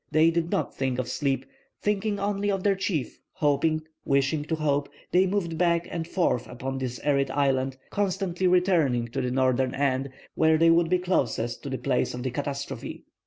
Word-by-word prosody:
They 155 +2 +4
did 170 0 -1
not - - -1
think 130 -2 -1
of 130 -2 -2
sleep. 135 -1 -1 0.3
Thinking 210 0 0
only 205 0 -1
of 195 -2 -1
their 200 - +4
chief, 185 -8 -2
hoping, 155 -1 +1 0.2
wishing 140 +2 +1
to 160 - -1
hope, 145 -2 0 0.2
they 185 +2 +4
moved 175 -4 -1
back 170 -1 +2
and 165 -1 -3
forth 170 -10 0
upon 130 +2 -5
that 125 -2 -4
arid 140 -2 +2
island, 135 -1 +1
constantly 190 -2 0
returning 170 -10 +2
to 135 +3 -2
the 125 - -1
northern 130 0 +1
end, 135 -1 0 0.2
where 160 0 +4
they 165 +1 +5
would 165 0 +3
be 180 - +4
closest 135 -10 -1
to 140 - -6
the 130 - -2
place 130 -2 0
of 125 - -5
the 130 - -2
catastrophe. 140 +1 -5
150 Hz, 185 wpm, -26 LUFS, 135-180 Hz, 0.3 s, they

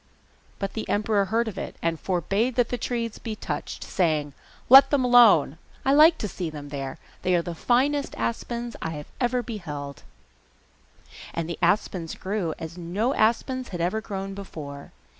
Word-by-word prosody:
But 195 -1 -4
the 220 - -5
emperor 205 -1 +2
heard 230 +3 0
of 195 -3 -5
it, - - -6
and 165 -1 -1
forbade 195 +7 0
the 245 - +4
trees 235 -1 -2
to - - -14
be 225 -2 -4
touched, - - -5
saying, 155 -5 0 0.3
'Let 270 +2 +9
them 275 -3 +2
alone; 220 - +6 0.3
I 270 - +4
like 315 +3 +7
to 210 - -3
see 180 -3 -4
them 145 -2 -8
there! 135 -2 -5 0.2
They 180 0 +2
are 170 - +1
the 175 - -5
finest 270 - +1
aspens 235 - -3
I 165 - -3
have 150 -1 -8
ever 245 0 +1
beheld!' 150 - -6 1.3
And 170 -1 -2
the 170 - -5
aspens 185 -5 0
grew 190 -5 -2
as 165 +2 -8
no 200 +10 -1
aspens 255 +3 +1
had 175 - -6
ever 180 +6 0
grown 195 -2 -5
before. 150 -8 -8
195 Hz, 170 wpm, -25 LUFS, 165-235 Hz, 1.3 s, Let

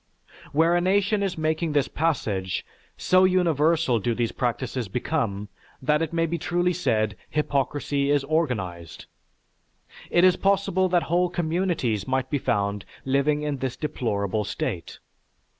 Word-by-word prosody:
Where 165 +4 +3
a 175 - +2
nation 200 +3 +2
is 195 -3 -1
making 160 0 0
this 145 -2 +2
passage, 105 - -1 0.3
so 185 0 +4
universal 165 -7 +3
do 115 +3 -1
these 120 -1 0
practices 125 -1 -2
become 105 -3 -2 0.3
that 150 +3 +1
it 165 - -1
may 165 0 +1
be 165 +1 -2
truly 175 +2 0
said 110 - 0
hypocrisy 140 -1 0
is 145 -1 +3
organized. 110 - -2 1.0
It 175 - +3
is 185 -1 +5
possible 195 -1 +2
that 175 -1 +2
whole 175 +1 +1
communities 165 - -1
might 130 +1 -1
be 145 - +1
found 100 -3 -1 0.2
living 140 +3 +1
in 145 -2 -2
this 130 -1 -3
deplorable 105 -8 -1
state." - - -4
150 Hz, 140 wpm, -25 LUFS, 120-175 Hz, 1.0 s, is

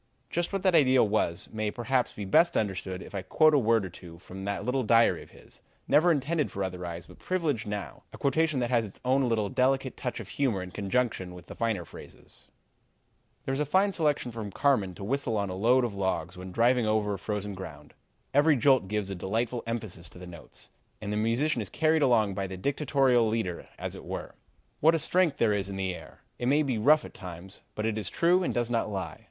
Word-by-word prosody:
Just 175 0 -1
what 195 -2 -2
that 185 -2 +3
ideal 130 -7 +5
was 95 -4 0
may 110 -1 -1
perhaps 125 +3 0
be 105 - -6
best 170 - +4
understood 95 -2 -2
if - - -13
I 100 - -2
quote 155 - +4
a 145 - +5
word 115 -3 +2
or - - -6
two 85 -1 -12
from 95 +2 -9
that 100 0 -3
little 130 +2 +1
diary 115 0 +4
of - - -14
his, - - -16 0.3
never 170 +4 +5
intended 150 +1 0
for 100 - -3
other 90 -1 -4
eyes 85 0 -6
but - - -16
privileged 155 -12 -1
now, 105 -1 -5
a - - -10
quotation 155 0 +1
that 120 +1 -1
has 120 -2 +3
its 100 -3 -10
own 130 0 +2
little, 110 -3 +1
delicate 130 +4 +1
touch 125 -2 -4
of 110 - -8
humor 120 -10 0
in 90 - -9
conjunction 100 -3 -1
with 90 -1 -12
the - - -9
finer 110 -7 -1
phrases: - - -13 1.0
"'There 135 - -1
is 135 - -2
a - - +2
fine 190 +6 +3
selection 150 -8 0
from 110 -3 -6
Carmen 105 -8 +1
to 100 - -9
whistle 125 0 -1
on 100 -2 -1
a - - -4
load 120 +7 +3
of 115 - -4
logs 95 -3 -2
when 90 0 -8
driving 120 +2 +3
over 105 -1 +1
frozen 105 +1 -4
ground; 75 -6 -9 0.4
every 145 +2 +5
jolt 130 -5 +3
gives 105 -1 -2
a - - -2
delightful 115 +6 -2
emphasis 105 -7 -5
to - - -15
the 90 - -9
notes, 85 -3 -12 0.3
and 105 -1 -4
the - - -1
musician 115 +5 +1
is 100 - -5
carried 160 0 +2
along 115 -7 +3
by 95 0 -3
the 95 0 -7
dictatorial 135 0 +2
leader 110 -6 -2
as - - -5
it - - -10
were. - - -6 0.5
What 160 +2 +5
a - - +3
strength 170 -1 +1
there 110 -2 +3
is 100 -1 -2
in 100 - -5
the 95 -1 -2
air! - - -12 0.2
It 120 - -1
may 145 +3 +4
be 130 -6 -1
rough 150 +7 +5
at - - -11
times, 90 +1 -10
but 110 - -2
it 110 -1 -1
is 100 -3 -2
true 175 +2 +3
and 180 - 0
does 120 -1 -1
not 115 -2 0
lie. 95 0 -5
115 Hz, 225 wpm, -28 LUFS, 95-135 Hz, 1.0 s, ideal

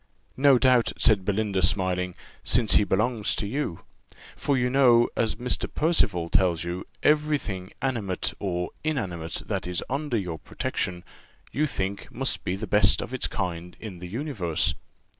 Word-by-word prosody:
"No 135 -1 +6
doubt," 125 -2 +3
said 105 -4 +4
Belinda, 100 -1 0
smiling, 90 -1 +1 0.3
"since 115 -3 +3
he - - +6
belongs 110 +2 0
to - - -3
you; 115 - -3 0.5
for 140 -2 0
you 125 0 +2
know, 125 -2 +5
as 115 - 0
Mr. 125 0 -1
Percival 150 - +2
tells 90 -2 +2
you, 85 +2 -4 0.2
every 150 0 +3
thing 95 -7 -6
animate 110 -9 -1
or 90 -3 -2
inanimate 90 - -3
that - - -3
is 90 -1 -2
under 140 -3 -1
your 90 -6 -4
protection, 90 -1 -3 0.5
you 150 +5 +1
think 100 -7 -4
must - - -1
be 90 - -1
the 105 +3 -4
best 95 -2 +4
of - - -5
its - - -1
kind 90 0 -4
in 100 -6 -8
the 90 - -7
universe." 95 - -1
100 Hz, 160 wpm, -26 LUFS, 90-125 Hz, 0.5 s, No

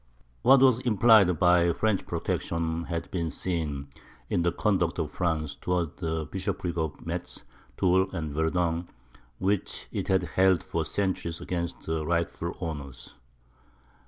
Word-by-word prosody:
What 130 +1 +6
was 130 -3 +5
implied 110 -7 +5
by 90 0 +4
French 110 +2 0
protection 85 0 -2
had 85 -1 -4
been 85 -3 -1
seen 75 -6 -3 0.4
in 85 - +2
the 85 0 +2
conduct 90 -5 +1
of 75 -2 -2
France 80 -4 -1
towards 90 -2 -2
the 80 -2 -1
bishoprics 85 +4 -3
of 80 -3 -3
Metz, - - -5 0.3
Toul, 95 +1 +3
and 80 -6 -4
Verdun, 85 +2 0 0.5
which 95 +4 -1
it - - -3
had 95 -1 +2
held 95 +1 +3
for 80 -1 -2
centuries 85 0 -2
against 85 -1 -3
the 80 -1 -1
rightful 85 +1 -2
owners. 70 -6 -6
85 Hz, 135 wpm, -28 LUFS, 80-95 Hz, 0.5 s, What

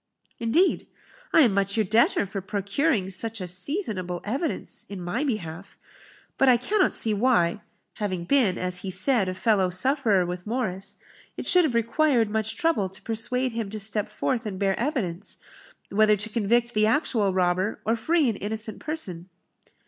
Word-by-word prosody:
"Indeed? 290 +12 +2 0.4
I 325 - +6
am 235 -8 +4
much 200 +1 0
your 220 - +3
debtor 220 +1 +3
for 195 0 -5
procuring 200 - -1
such 225 +4 0
a 185 - -4
seasonable 185 - -2
evidence 270 +10 -3
in 200 -2 -6
my 180 +10 -2
behalf. 195 - -5 0.6
But 270 - +5
I 245 - +6
cannot 385 - +1
see 220 - +2
why 205 -5 +2 0.4
(having 185 -5 -2
been, 210 -2 +2
as 180 0 0
he 190 - -5
said, 195 +2 +2
a 185 - -4
fellow 190 -1 +2
sufferer 205 -1 +2
with 180 +2 -6
Morris) 210 -5 -3 0.4
it - - -5
should 360 -2 +5
have 255 -6 -1
required 235 0 +2
much 220 0 -1
trouble 320 - +1
to 190 - -13
persuade 250 +3 -1
him 225 -3 -4
to 215 +1 -5
step 210 0 -1
forth 230 +2 -2
and 195 -3 -5
bear 195 0 +1
evidence, 215 - -2 0.5
whether 215 +1 +4
to 210 +2 -1
convict 235 +2 +1
the 215 0 +3
actual 225 -5 +1
robber, 185 +2 0
or 225 - +2
free 310 +6 +1
an 220 -4 -1
innocent 215 +1 -3
person." 190 - -4
215 Hz, 170 wpm, -25 LUFS, 190-245 Hz, 0.6 s, I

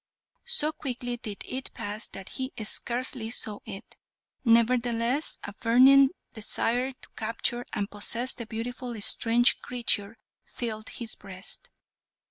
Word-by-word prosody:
So 315 -11 +4
quickly 245 -4 -4
did 210 -3 -6
it 260 +1 -5
pass 215 -1 -3
that 195 -1 -9
he 260 0 -3
scarcely 240 +1 -1
saw 215 -3 -1
it; 195 - -9 0.5
nevertheless 235 +3 +2
a 200 - -6
burning 260 +5 +6 0.2
desire 240 +4 0
to - - -10
capture 230 +2 -1
and 200 - -2
possess 230 +5 0
the 235 - -6
beautiful 240 +1 -5
strange 230 +3 +5
creature 230 -3 0 0.3
filled 220 -2 -4
his 230 -2 -4
breast. 190 -1 -7
235 Hz, 120 wpm, -28 LUFS, 220-250 Hz, 0.5 s, burning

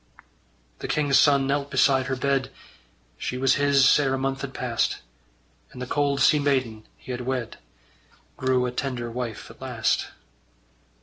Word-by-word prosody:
The - - -5
king's 145 -2 +2
son 140 -2 +4
knelt 140 +1 -1
beside 130 -1 +3
her 135 - -1
bed: 135 0 0 0.7
She 125 - -3
was 135 0 +3
his 140 -1 +5
ere 135 -2 +1
a - - -2
month 135 0 -2
had 140 - -5
passed; 120 -3 -1 0.7
And 125 - -11
the 125 - -4
cold 140 +1 0
sea 150 +2 +5
maiden 130 -6 -1
he - - -9
had 125 0 -4
wed 125 -2 -4 0.8
Grew 130 -1 +1
a 125 - -2
tender 125 -2 -4
wife 120 -2 -5
at - - -18
last. - - -1
135 Hz, 160 wpm, -25 LUFS, 125-140 Hz, 0.8 s, his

